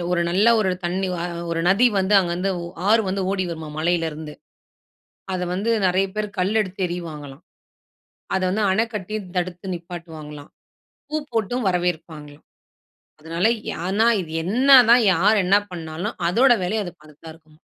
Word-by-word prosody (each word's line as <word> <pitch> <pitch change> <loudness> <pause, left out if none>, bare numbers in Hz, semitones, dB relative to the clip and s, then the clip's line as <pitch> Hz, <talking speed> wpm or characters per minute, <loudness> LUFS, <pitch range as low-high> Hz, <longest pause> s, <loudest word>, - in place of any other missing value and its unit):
ஒரு 175 -1 +1
நல்ல 200 +6 +3
ஒரு 190 - +1
தண்ணி 185 +2 -1
அ - - -3 0.3
ஒரு 165 0 -1
நதி 210 +6 +5
வந்து 190 +2 +1
அங்கேருந்து 180 +1 -1 0.4
ஆறு 225 0 +5
வந்து 195 0 -1
ஓடி 190 -1 -1
வருமா, 160 -2 -6
மலையிலிருந்து. 160 -2 -2 1.0
அத 180 - -2
வந்து 210 +5 -1 0.2
நெறைய 190 +2 +1
பேரு 215 0 -2
கல் 195 +4 +1
எடுத்து 190 -1 -6
எறியுவாங்கலாம். 155 -4 -7 0.9
அத 190 - 0
வந்து 210 +3 0
அணை 220 +4 +2
கட்டி 210 +1 -5 0.2
தடுத்து 180 +1 -3
நிப்பாட்டுவாங்களாம். 160 -4 -9 0.6
பூ 305 - -2 0.2
போட்டும் 230 +1 -1
வரவேற்பாங்களாம். 160 -5 -3 0.8
அதனால 165 +4 -2 0.4
ஆனா 210 +4 +2 0.2
இது 160 -2 -9
என்ன 245 +10 0 0.2
தான் 240 -1 +6
யார் 210 +5 +3
என்ன 195 +2 +4 0.2
பண்ணாலும், 160 -1 -5
அதோட 250 +8 +4
வேலைய 210 +4 -1
அது 175 - -6
பார்த்துதான் 155 +1 -13
இருக்கும். 155 -1 -22
180 Hz, 145 wpm, -22 LUFS, 165-200 Hz, 1.0 s, தான்